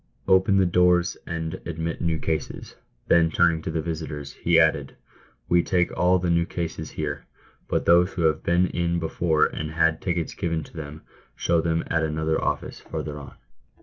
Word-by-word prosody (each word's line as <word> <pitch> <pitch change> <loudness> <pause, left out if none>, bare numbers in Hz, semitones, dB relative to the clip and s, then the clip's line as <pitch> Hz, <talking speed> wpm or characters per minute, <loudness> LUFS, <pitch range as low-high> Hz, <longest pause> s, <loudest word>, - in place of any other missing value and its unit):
" - - -42
Open 95 +1 +4
the 95 - +4
doors 90 0 +3
and 80 -1 -4
admit 80 0 -4
new 85 -2 0
cases." 80 0 -4 0.3
Then, 85 -1 +4
turning 80 0 +2
to - - -5
the 80 -1 -2
visitors, 80 -4 -5
he 85 -1 +2
added, 80 -4 +2 0.3
" - - -34
We 85 0 +4
take 90 0 0
all 90 +1 +3
the 90 -1 -1
new 85 0 +2
cases 80 -2 -4
here; 75 -2 -5 0.4
but - - -1
those 90 +2 +4
who 85 - -2
have 80 -3 +2
been 85 +2 +2
in 85 -1 -1
before 80 -1 +1
and 75 0 -4
had 80 0 +1
tickets 85 -3 -2
given 80 -2 -2
to - - -15
them, 75 -1 -8 0.3
show 85 -1 +1
them 80 0 0
at 85 - 0
another 80 0 -1
office - - -3
farther 75 -1 -6
on." 70 - -11
80 Hz, 185 wpm, -24 LUFS, 80-85 Hz, 0.4 s, Open